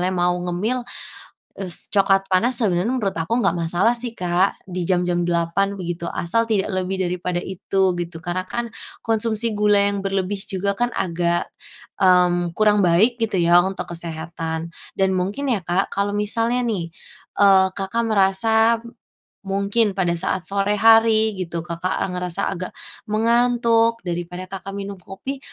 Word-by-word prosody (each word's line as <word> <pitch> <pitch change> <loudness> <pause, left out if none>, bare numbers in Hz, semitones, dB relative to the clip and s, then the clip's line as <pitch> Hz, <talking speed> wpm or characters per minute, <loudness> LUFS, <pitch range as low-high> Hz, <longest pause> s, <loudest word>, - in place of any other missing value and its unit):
mau 175 0 +2
ngemil, 180 +8 -2 0.8
s 185 -4 0
coklat 195 -1 +2
panas 225 +6 +3
sebenarnya 195 -1 +1
menurut 225 -7 -1
aku 165 +9 -1
nggak 195 -8 +1
masalah 175 +7 +1
sih, 240 0 -2
Kak. 180 -3 0
Di 180 -1 -4
jam-jam 175 0 +1
8.00, 175 +4 0
begitu. 175 -2 -4
Asal 230 +7 0
tidak 200 -3 +1 0.2
lebih 190 +1 -3
daripada 180 0 -2
itu, 190 0 -1
gitu. 175 -1 -5
Karena 175 +2 -3
kan, 235 +4 -5 0.3
konsumsi 225 0 +1
gula 210 0 +3
yang 200 0 +1
berlebih 195 0 -2
juga 200 +1 -1
kan, 240 +3 -1
agak, 175 -4 -1 0.6
mmm, 175 -2 +3
kurang 210 -1 +4
baik, 215 +8 +3
gitu 215 -4 0
ya 175 +1 +5
untuk 190 0 -4
kesehatan. 165 0 -5 0.2
Dan 190 0 +2
mungkin 195 +10 -2
ya 230 -8 0
Kak, 175 +3 -1
kalau 200 +1 0
misalnya 230 +4 +1
nih, 185 -7 -2 0.5
eee, 195 -2 +6
Kakak 195 +4 -1
merasa 220 +2 +3
m 235 0 -14 0.5
mungkin 200 +2 0
pada 180 -3 +1
saat 185 +2 -1
sore 200 +1 0
hari 225 0 +5
gitu, 170 -2 -4
Kakak, 170 +1 -3
eee, 185 - -3
merasa 180 +2 -2
agak, 185 -1 -6 0.3
mengantuk. 230 +1 +2
Daripada 175 0 -5
Kakak 195 +1 -8
minum 200 -1 -6
kopi, 230 +10 -7
195 Hz, 150 wpm, -21 LUFS, 175-220 Hz, 0.8 s, eee